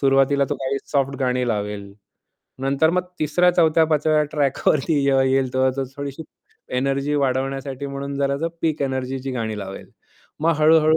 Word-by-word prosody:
सुरुवातीला 135 Hz, 0 st, +3 dB
तो 145 Hz, -, +1 dB
काही 135 Hz, +1 st, -2 dB
सॉफ्ट 140 Hz, -1 st, +1 dB
गाणी 125 Hz, -1 st, +1 dB
लावेल. 105 Hz, -2 st, -3 dB, 0.7 s
नंतर 140 Hz, +4 st, +2 dB
मग 180 Hz, 0 st, +1 dB, 0.2 s
तिसऱ्या 165 Hz, +4 st, +3 dB
चौथ्या 160 Hz, -2 st, +4 dB
पाचव्या 155 Hz, 0 st, +2 dB
ट्रॅकवरती 145 Hz, +1 st, +1 dB
जेव्हा 135 Hz, -1 st, +4 dB
येईल 130 Hz, -1 st, +1 dB
तेव्हा 130 Hz, 0 st, +3 dB
तो 135 Hz, -, -1 dB
थोडीशी 140 Hz, +2 st, -5 dB, 0.5 s
एनर्जी 140 Hz, +2 st, 0 dB
वाढवण्यासाठी 135 Hz, 0 st, -1 dB
म्हणून 140 Hz, 0 st, -5 dB
जरासं 140 Hz, +4 st, 0 dB
पीक 155 Hz, -3 st, 0 dB
एनर्जीची 130 Hz, 0 st, -3 dB
गाणी 110 Hz, -4 st, -3 dB
लावेल. 95 Hz, -1 st, -8 dB, 0.5 s
मग 165 Hz, +1 st, +3 dB
हळू-हळू 155 Hz, 0 st, +5 dB
140 Hz, 150 wpm, -22 LUFS, 130-150 Hz, 0.7 s, हळू-हळू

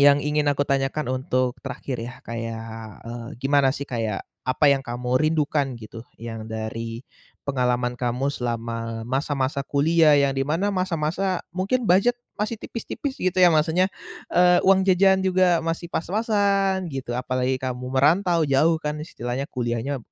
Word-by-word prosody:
yang 145 Hz, 0 st, +7 dB
ingin 150 Hz, 0 st, +1 dB
aku 145 Hz, 0 st, +1 dB
tanyakan 135 Hz, +1 st, 0 dB
untuk 130 Hz, -1 st, -1 dB
terakhir 130 Hz, -3 st, -5 dB
ya, 120 Hz, +2 st, -6 dB
kayak, 115 Hz, -1 st, -5 dB, 0.4 s
eee, 115 Hz, 0 st, -7 dB
gimana 135 Hz, +1 st, +3 dB
sih 140 Hz, -, -4 dB
kayak 115 Hz, -6 st, -3 dB, 0.2 s
apa 130 Hz, -, +1 dB
yang 135 Hz, -, +1 dB
kamu 125 Hz, +1 st, -1 dB
rindukan 150 Hz, -4 st, +1 dB
gitu? 115 Hz, 0 st, -10 dB, 0.2 s
Yang 115 Hz, -1 st, -7 dB
dari 110 Hz, +1 st, -4 dB, 0.5 s
pengalaman 125 Hz, -2 st, 0 dB
kamu 125 Hz, +3 st, 0 dB
selama 115 Hz, -2 st, -4 dB
masa-masa 135 Hz, +2 st, -1 dB
kuliah 155 Hz, +2 st, +4 dB
yang 140 Hz, -1 st, +3 dB
di 135 Hz, -, +1 dB
mana 165 Hz, +8 st, 0 dB
masa-masa 185 Hz, 0 st, -1 dB
mungkin 200 Hz, +7 st, 0 dB
budget 200 Hz, +8 st, +4 dB, 0.2 s
masih 210 Hz, +2 st, -1 dB
tipis-tipis 265 Hz, +4 st, -5 dB
gitu 185 Hz, 0 st, 0 dB
ya, 175 Hz, -, +9 dB
maksudnya, 165 Hz, +4 st, +3 dB, 0.4 s
eee, 180 Hz, 0 st, +5 dB
uang 190 Hz, 0 st, +4 dB
jajan 190 Hz, +1 st, +5 dB
juga 185 Hz, -2 st, +3 dB
masih 165 Hz, +1 st, -3 dB
pas-pasan 195 Hz, 0 st, +1 dB
gitu, 125 Hz, -2 st, -4 dB
apalagi 130 Hz, +1 st, 0 dB
kamu 125 Hz, -1 st, -4 dB
merantau 165 Hz, +5 st, +3 dB
jauh 155 Hz, +4 st, +3 dB
kan 150 Hz, -1 st, -3 dB
istilahnya, 130 Hz, -2 st, -4 dB
kuliahnya 125 Hz, +2 st, -2 dB
140 Hz, 145 wpm, -24 LUFS, 125-175 Hz, 0.5 s, ya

